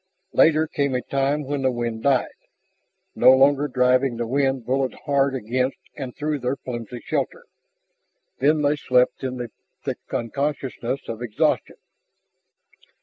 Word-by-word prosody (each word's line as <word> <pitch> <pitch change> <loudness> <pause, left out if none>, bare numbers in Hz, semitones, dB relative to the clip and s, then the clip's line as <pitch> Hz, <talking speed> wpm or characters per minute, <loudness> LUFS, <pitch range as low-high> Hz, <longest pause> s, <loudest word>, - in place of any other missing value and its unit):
Later 155 0 +5
came 140 -4 -1
a 125 - -1
time 140 +2 0
when 140 0 -3
the 130 - +2
wind 120 -2 -3
died, 135 -1 +2 0.8
no 130 - +7
longer 140 +2 +4
driving 125 -1 +2
the 120 - -2
rain 135 +1 +1
bullet 130 +2 -1
hard 140 -1 +2
against 125 +3 -1 0.2
and 130 -4 -6
through 150 0 -2
their 125 +1 -1
flimsy 120 -2 -7
shelter. - - -2 1.0
Then 150 +3 +3
they 145 +1 +2
slept 125 -1 +2
in 130 -1 -3
the 120 -2 -5 0.3
thick - - -3
unconsciousness 135 0 -2
of 115 0 -5
exhaustion. 120 -4 0
130 Hz, 140 wpm, -23 LUFS, 125-140 Hz, 1.0 s, no